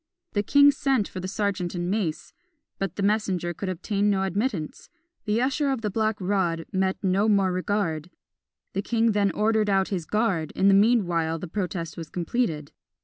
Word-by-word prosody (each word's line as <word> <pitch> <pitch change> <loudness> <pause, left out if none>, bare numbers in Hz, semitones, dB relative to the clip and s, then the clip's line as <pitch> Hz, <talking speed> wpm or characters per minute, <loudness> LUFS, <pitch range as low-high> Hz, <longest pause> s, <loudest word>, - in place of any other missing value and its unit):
The 205 - +2
king 285 +7 +6
sent 270 -7 0
for 185 - -7
the 185 - -4
serjeant 195 -3 -2
and 175 0 -2
mace, 180 -7 -2 0.5
but 195 - -3
the 200 - -2
messenger 195 -4 0
could 190 +3 -5
obtain 200 +3 0
no 195 -1 +1
admittance 195 - -3 0.4
the 215 +1 +1
usher 275 +3 +1
of 265 -4 -1
the 210 -2 -2
black 220 +1 0
rod 180 -4 0
met 190 -1 0
no 195 +3 +2
more 195 -3 +3
regard. 180 -4 -1 0.6
The 195 - -1
king 230 +1 +1
then 205 -1 +2
ordered 215 +1 +1
out 195 -1 +2
his 180 -5 -3
guard 205 -8 0
in 195 - +4
the - - +6
meanwhile 180 -7 +3
the 180 - -6
protest 170 -3 -4
was 165 -2 -7
completed. 170 - -2
195 Hz, 180 wpm, -25 LUFS, 175-215 Hz, 0.6 s, king